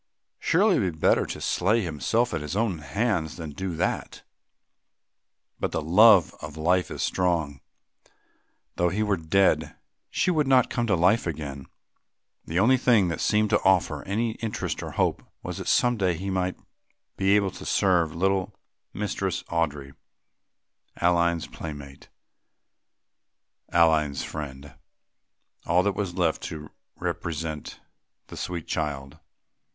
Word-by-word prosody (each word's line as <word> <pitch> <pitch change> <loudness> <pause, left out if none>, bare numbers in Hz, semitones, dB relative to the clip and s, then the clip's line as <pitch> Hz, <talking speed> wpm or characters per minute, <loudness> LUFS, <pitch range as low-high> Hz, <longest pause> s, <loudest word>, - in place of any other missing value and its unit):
Surely - - +3
it - - +2
were 90 - 0
better 80 - +2
to - - -6
slay 105 +5 +1
himself 90 - 0
with 80 - -2
his 75 +4 -5
own 105 -6 0
hands 90 -2 -1
than 80 -3 -6
do 90 +3 -4
that! - - -3 1.4
But - - -2
the - - -1
love 95 +2 +6
of 75 0 -8
life 90 +3 +1
is - - -4
strong. 80 -7 0 1.2
Though 90 0 +2
he 105 +4 -1
were 105 -2 +1
dead, 80 -2 +1 0.3
she 185 - +1
would 155 -5 +1
not 130 -2 +4
come 120 -2 -1
to 100 - +3
life 90 +6 +3
again; 70 -4 -5 0.8
the 80 - -3
only 120 +7 +5
thing 115 -7 +3
that 85 - -3
seemed 105 0 +2
to 105 - +3
offer 95 -2 +2
any 110 +4 -1
interest 115 -2 -3
or - - -6
hope - - 0 0.2
was - - -5
that - - -6
some 120 -1 +3
day 90 -4 +1
he 95 +4 -4
might 90 -1 -1 0.6
be 95 +1 +3
able 100 -2 +2
to - - -10
serve 85 -5 +2
little 95 +2 0 0.4
Mistress 100 -3 -2
Audry, 75 -5 -2 1.0
Aline's 85 -1 +2
playmate, 70 -3 -9 1.6
Aline's 80 -4 +3
friend, 70 -2 -7 0.9
all 90 +1 +3
that 100 0 +1
was 95 -2 -3
left 85 -4 0
to 75 -1 -7 0.2
represent 80 -2 -4 0.5
the - - -9
sweet 85 -3 -4
child. 75 -2 -4
90 Hz, 140 wpm, -26 LUFS, 80-100 Hz, 1.6 s, love